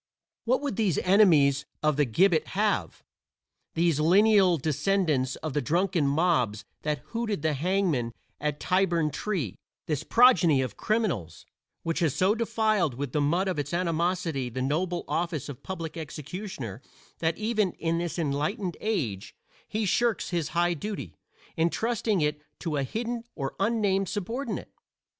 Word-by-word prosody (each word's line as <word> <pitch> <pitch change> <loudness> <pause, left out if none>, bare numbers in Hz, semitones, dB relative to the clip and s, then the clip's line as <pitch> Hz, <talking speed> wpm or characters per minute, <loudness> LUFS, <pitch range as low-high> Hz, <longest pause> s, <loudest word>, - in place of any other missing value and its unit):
What 255 +4 +2
would 285 -4 -3
these 200 -9 +1
enemies 155 -8 +4 0.2
of 155 -1 +3
the 145 0 +3
gibbet 165 - +3
have 210 0 0 0.7
these 165 -3 +2
lineal 190 +2 +5
descendants 155 -3 +1
of 155 -3 -3
the 145 - +1
drunken 170 +2 +1
mobs 140 - +1 0.2
that 150 -4 -2
hooted 225 -8 -2
the 155 -1 +2
hangman 160 -6 0 0.3
at 150 0 -2
Tyburn 175 -4 +1
Tree; 170 - -2 0.3
this 150 -3 -1
progeny 185 - +5
of 125 -5 -5
criminals, 205 - -1 0.4
which 165 0 -1
has 160 -6 +1
so 190 +3 +3
defiled 215 - +1
with 140 0 -4
the 150 - +1
mud 170 +7 +1
of 180 -5 -1
its 145 +4 -2
animosity 170 -5 0
the 120 - -5
noble 170 +7 -1
office 170 -4 -2
of 135 - -8
public 165 -4 -5
executioner 150 - -6 0.4
that 165 0 0
even 215 -4 0
"in 165 0 -1
this 175 0 -3
enlightened 160 +4 -1
age" 140 - -2 0.3
he 215 0 -1
shirks 210 +3 +1
his 170 -4 0
high 175 0 +3
duty, 205 +5 -5 0.4
entrusting 210 +3 +1
it 150 0 0 0.2
to 160 -3 -3
a 140 - +1
hidden 230 - -3
or 135 -3 -3
unnamed 195 -2 +1
subordinate? 230 +7 -4
170 Hz, 145 wpm, -27 LUFS, 145-200 Hz, 0.7 s, lineal